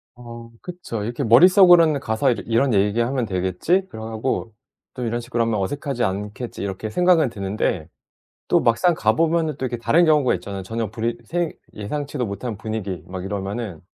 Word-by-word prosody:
어 120 -1 -10
그쵸. 175 - -6
이렇게 120 +6 -3
머릿속으로는 170 - +6
'가서 125 +1 +1
이 - - 0
이런 115 +3 +2
얘기 105 +2 +2
하면 125 +1 0
되겠지.' 95 - 0
그러고 110 0 -4 0.4
'또 125 - -5
이런 120 +1 -1
식으로 120 0 -1
하면 115 -2 0
어색하지 135 +4 -2
않겠지.' 105 +4 -4
이렇게 100 +2 -4
생각은 175 +1 +3
드는데 95 -5 -2 0.6
또 - - +4
막상 165 +10 +3
가보면은 160 +7 +1
또 - - -3
이렇게 125 -1 -2
다른 165 +9 +3
경우가 150 -5 +3
있잖아요. 95 +2 -6
전혀 115 +2 -4
분위 115 +1 -2
생 170 +5 -2 0.2
예상치도 140 +4 -4
못한 110 +3 -5
분위기 105 -6 -4
막 90 0 -6
이러면은 100 -2 -4
115 Hz, 385 characters per minute, -22 LUFS, 105-140 Hz, 0.6 s, 머릿속으로는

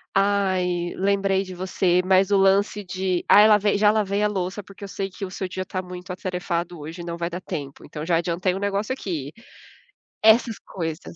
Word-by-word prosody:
"Ai, 185 -3 +1
lembrei 195 0 +1
de 185 -1 -9
você", 180 0 +1
mas 190 +1 +4
o 200 - +5
lance 195 +1 +2
de: 185 0 -2
"Ah, 205 - +8
eu 220 - +6
lavei 210 -1 +4
já 210 0 +5
lavei 205 -1 0
a 210 - +3
louça, 190 +1 -3
porque 200 +1 -11
eu - - -7
sei 195 0 -4
que 195 +2 -6
o 185 - -7
seu 190 - -4
dia 185 +1 -4
tá 185 0 -3
muito 180 0 -9
atarefado 180 -2 -3
hoje, 160 +4 -7
não 170 0 -5
vai 170 0 -2
dar 180 +2 -6
tempo, 145 -7 -6
então, 150 0 -7
já 170 0 +2
adiantei 175 +2 0
um - - -4
negócio 200 +4 -1
aqui". 160 - -5 0.9
Essas 220 0 +4
coisas. 165 -2 -6
185 Hz, 205 wpm, -24 LUFS, 175-200 Hz, 0.9 s, Ah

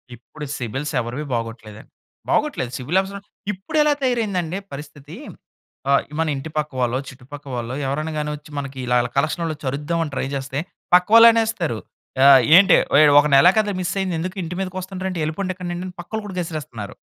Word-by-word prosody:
ఇప్పుడు 150 +6 -10
సిబిల్స్ 135 +6 -4
ఎవరివి 120 +6 -5
బాగోట్లేదండి. 115 -2 -6 0.4
బాగోట్లేదు 125 - 0
సిబిల్స్ 160 +9 +1
అసలా 200 +1 -8 0.3
ఇప్పుడు 210 +12 -5
ఎలా 300 -1 +3
తయారయిందండి 200 -9 -1
పరిస్థితి 145 0 -10 0.7
ఆ! - - +4 0.3
మన 165 - +2
ఇంటి 140 +4 -6
పక్క 150 0 -1
వాళ్ళో, 125 0 +1
చుట్టుపక్క 140 +2 -12
వాళ్ళో 120 +1 -4
ఎవరైనా 155 +3 -2
గాని 150 0 -2
వచ్చి 150 +1 -14
మనకి 140 -1 -5
ఇలా 125 - +1
అలా 120 - -3
కలెక్షన్‌ 155 +4 0
ఆళ్ళు 160 - -1
వచ్చి 145 - -12
అరుదాం 150 +5 -2
అని 150 - -6
ట్రై - - -1
చేస్తే 135 +1 -3 0.3
పక్కవాళ్ళు 225 +6 +8
అనేస్తారు." 220 - 0 0.5
ఆ! - - +7 0.3
ఏంటి 195 +1 +7 0.4
ఒక 145 - +3
నెలే 170 +7 +7
కదా 210 -1 +2
మిస్ 175 - -2
అయింది 185 -3 -1
ఎందుకు 185 +4 -4
ఇంటి 175 +2 -5
మీదకి 185 0 -4
వస్తుండ్రు 190 0 -5
ఎళ్ళిపొండి 185 +4 -3
ఇక్కడి 180 -1 -6
నుండి" 185 -1 -8
పక్కోళ్ళు 220 +4 -5
కూడా 195 -3 -7
గసిరేస్తున్నారు. 155 - -6
155 Hz, 175 wpm, -21 LUFS, 135-185 Hz, 0.7 s, పక్కవాళ్ళు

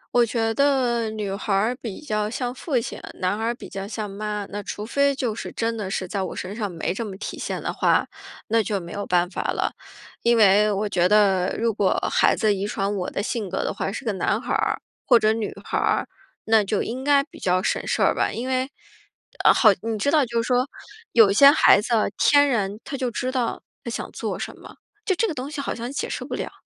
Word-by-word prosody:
我 240 - +6
觉 225 -1 0
得 245 -4 +2
女 210 -3 -4
孩 200 +1 -4
儿 215 +6 +2
比 220 -5 -6
较 215 -7 -2
像 245 +1 -3
父 265 -1 -1
亲， - - -6
男 185 +2 -1
孩 220 +1 -3
儿 235 +1 0
比 - - -10
较 195 0 -6
像 215 -1 -4
妈， 210 0 -4
那 205 +1 -4
除 205 +2 -6
非 280 +3 +2
就 245 -5 -1
是 - - -6
真 230 0 -2
的 205 -4 -4
是 185 -1 -3
在 195 +1 -3
我 185 - -4
身 190 +3 -5
上 205 -4 -3
没 170 +1 -2
这 230 - -4
么 195 -3 -7
体 - - -6
现 - - -3
的 - - -2
话， - - +2 0.4
那 225 0 +3
就 200 -1 -2
没 170 -1 -9
有 205 -1 -5
办 180 0 +2
法 180 - -4
了。 - - -1 0.5
因 235 0 +3
为 210 0 +5
我 205 +1 -1
觉 180 -2 +2
得 195 -3 +3
如 230 -1 +1
果 200 -2 +1 0.2
孩 - - +4
子 215 -1 +2
遗 200 +1 -2
传 200 0 -2
我 180 -2 -2
的 200 - -3
性 215 -5 -3
格 190 - -2
的 - - -2
话， 195 - -3
是 255 +5 -6
个 215 - 0
男 195 +3 0
孩 - - -3
儿 - - 0 0.2
或 245 -3 +6
者 215 0 +3
女 220 -2 -3
孩 - - -1
儿， - - +1 0.4
那 220 -1 +4
就 200 +1 -1
应 255 +3 -5
该 280 0 +4
比 285 - -15
较 185 +1 +1
省 - - -1
事 - - +1
儿 - - +4
吧。 - - 0
因 245 +3 -4
为 260 +1 0 0.7
呃， - - +8
好， 220 - +6
你 225 -1 -2
知 285 +8 +1
道 305 -3 +4
就 230 0 0
说 250 +2 +1 0.4
有 220 -4 +7
些 280 +6 +8
孩 285 -8 +6
子 - - -6 0.3
天 285 0 +5
然 210 -5 0
他 280 - -6
就 255 -2 -1
知 250 +3 -3
道 250 -3 -2 0.2
他 - - -5
想 235 - -5
做 - - -4
什 - - -6
么， - - -13 0.3
就 380 - +2
这 450 - +1
个 330 - -3
东 270 +1 -5
西 300 -1 -6
好 275 - -2
像 235 +2 -5
解 280 - -3
释 - - -4
不 - - -5
了。 - - -5
220 Hz, 260 characters per minute, -23 LUFS, 200-245 Hz, 0.7 s, 呃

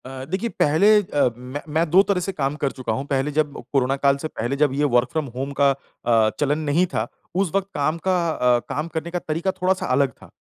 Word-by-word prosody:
अ, 130 0 -7
देखिए 190 +9 -2
पहले 180 +5 +4
अ, 145 -9 +1
मैं 130 +4 -7
मैं 160 +1 +1
2 180 +5 +7
तरह 200 -2 0
से 195 - -2
काम 145 -5 -2
कर 140 - +1
चूका 125 -4 -3
हूँ। 135 +5 -3
पहले 140 +1 0
जब 150 -1 0 0.2
कोरोना 135 -1 +2
काल 140 0 +5
से 155 - -4
पहले 120 -3 -3
जब 145 -2 +2
ये 145 +2 0
वर्क 120 +1 +3
फ्रॉम 160 -2 -1
होम 135 +2 -3
का 140 -1 +5
अ, 115 -4 0
चलन 145 +1 +1
नहीं 155 +3 +2
था - - -1 0.3
उस 190 -3 +1
वक़्त 195 -1 +1
काम 150 +3 0
का 185 - +3
अ, 125 -5 +2
काम 150 +4 -2
करने 165 +1 -5
का 175 - -1
तरीका 165 +4 -2
थोड़ा-सा 185 0 +1
अलग 135 +1 +2
था। - - -14
145 Hz, 235 wpm, -22 LUFS, 135-170 Hz, 0.3 s, 2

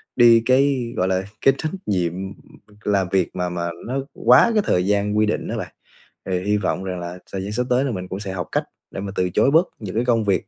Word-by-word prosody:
đi 120 -2 +7
cái, 130 -2 +2
gọi 90 - +1
là, 95 0 0 0.2
cái 135 - +5
trách 155 - -3
nhiệm, 90 -4 0
ừm, 95 +1 -6 0.5
làm 100 -3 +1
việc 95 -3 0
mà 90 -1 -1
mà 85 -1 -3 0.2
nó 130 +2 -2 0.2
quá 125 - +5
cái 210 -2 +2
thời 90 +1 +2
gian 105 +1 +1
quy 110 - +4
định 105 - -2
á - - -3
bạn. - - -6 0.6
Thì 90 -1 +1
hy 105 +1 +1
vọng 95 -1 -1
rằng 90 -2 -4
là 85 +1 -6
thời 95 - -3
gian 100 - -5
sắp 120 +4 0
tới 125 +2 +3
là 135 - -1
mình 90 -4 -5
cũng 95 - -5
sẽ 100 -2 -5
học 90 -2 -4
cách - - +1 0.3
để - - -6
mà 100 0 -5
từ 90 0 +1
chối 130 - +3
bớt 165 +4 +4
những 105 -2 -6
cái 120 - +1
công 115 -3 +2
việc 95 -1 0
100 Hz, 260 wpm, -22 LUFS, 95-120 Hz, 0.6 s, đi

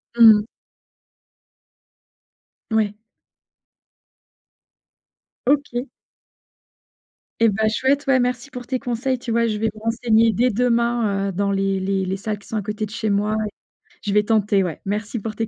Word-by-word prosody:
Mmh. 220 -2 +7 2.3
Ouais. 210 -2 +1 2.5
OK. 275 -2 +1 1.5
Et 230 - +5
bah, 215 +2 +1
chouette, 270 +6 0
ouais, 265 -1 +4
merci 250 +2 -1
pour 250 -1 -8
tes 255 0 -2
conseils! 245 +2 -2
Tu 245 - -8
vois, 230 0 +2
je 215 -2 -1
vais 225 - +1
me 215 0 -6
renseigner 225 0 +2
dès 245 +6 +2
demain, 235 -3 +1
heu, - - -3
dans 200 +2 -1
les 195 0 0
les 190 0 -1
les 190 +1 -2
salles 210 +1 -4
qui 200 - -19
sont 225 - -5
à 210 - -2
côté 210 +1 -3
de - - -17
chez 220 -1 -2
moi 205 +2 +1
et 210 - -3 0.6
je 205 - -1
vais 210 - +5
tenter, 210 -2 +2
ouais. 175 -3 -4
Merci 210 +3 -3
pour 215 +1 -5
tes 225 - -2
220 Hz, 155 wpm, -21 LUFS, 205-240 Hz, 2.5 s, Mmh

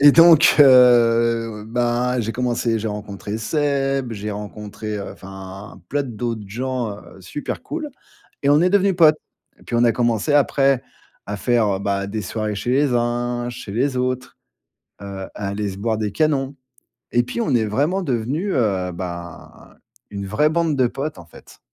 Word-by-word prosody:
Et 145 0 +8
donc, 165 -1 +7
heu, 115 -4 +5
ben, 120 +2 0
j'ai 115 0 -2
commencé, 120 -2 0
j'ai 110 - -4
rencontré 105 0 -5
Seb, 135 -1 0
j'ai 105 0 -5
rencontré, 105 +1 -6
heu, 100 - -6
enfin, 95 +1 -10
plein 145 +1 0
d 135 - -7
d'autes 115 -2 -3
gens, 125 +1 -3
heu, 95 - -15
super 145 - -6
cool! 305 +2 -5 0.5
Et 140 - +3
on 145 +1 +5
est 180 - +4
devenus 195 -1 +3
potes. 155 -3 +6 0.4
Et - - -20
puis - - -6
on 120 - +3
a 115 - +4
commencé 120 +2 0
après 135 -2 +3 0.4
à 105 - -4
faire, 120 +1 +2
heu, - - -5
bah, 100 0 -1
des 105 +2 -4
soirées 105 +2 -3
chez 105 +4 -3
les 135 +1 +2
uns, 120 0 -1
chez 115 -4 -8
les 130 +5 0
autres, 125 0 -2 0.7
heu, 100 -1 -6
à 100 - -4
aller 100 +1 -2
se 95 - -7
boire 110 +2 -1
des 105 -1 -2
canons. 140 -1 0 0.6
Et 120 - +4
puis 180 - -4
on 215 - 0
est 115 -2 +3
vraiment 145 - 0
devenus, 140 - -1
heu, 95 -7 0
ben, 85 -1 -8 0.3
une 100 -1 -5
vraie 150 +10 +2
bande 165 -2 +1
de 130 -2 +3
potes, 140 +5 -4
en 85 - -11
fait. 85 - -16
120 Hz, 180 wpm, -21 LUFS, 105-135 Hz, 0.7 s, Et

